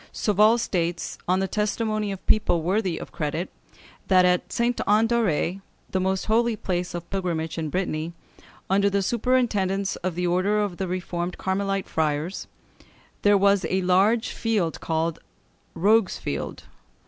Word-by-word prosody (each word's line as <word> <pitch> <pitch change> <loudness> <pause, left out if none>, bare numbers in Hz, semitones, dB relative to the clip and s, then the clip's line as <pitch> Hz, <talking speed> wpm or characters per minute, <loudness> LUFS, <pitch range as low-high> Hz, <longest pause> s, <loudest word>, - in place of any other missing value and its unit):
Sauval 215 +2 +3
states, 175 -6 -2
on 185 +2 +2
the 195 - 0
testimony 215 +1 -1
of 195 - -7
people 175 -6 +2
worthy 185 -1 0
of - - -8
credit, 155 +3 -3 0.6
that 185 -1 +5
at 180 0 +1
Sainte 240 0 0
Anne 215 +2 +4
d'Auray, 195 -5 0 0.3
the 190 - 0
most 190 0 0
holy 230 +1 +2
place 180 -3 -3
of 170 0 -6
pilgrimage 170 -4 -2
in 155 -1 -2
Brittany, 165 -1 -2 0.5
under 200 +1 +3
the 200 0 0
superintendence 205 -4 +1
of 185 -2 -3
the 180 0 -1
order 185 +4 +2
of 205 -4 -2
reformed 180 -1 -3
Carmelite 195 0 -1
friars, 155 +3 -2 0.7
there 205 0 +5
was 200 -1 +3
a 190 0 0
large 195 +6 +3
field 210 -8 -1
called 160 0 -1 0.6
the - - -8
Rogue's 210 +2 +3
Field. - - -5
190 Hz, 150 wpm, -25 LUFS, 175-210 Hz, 0.7 s, that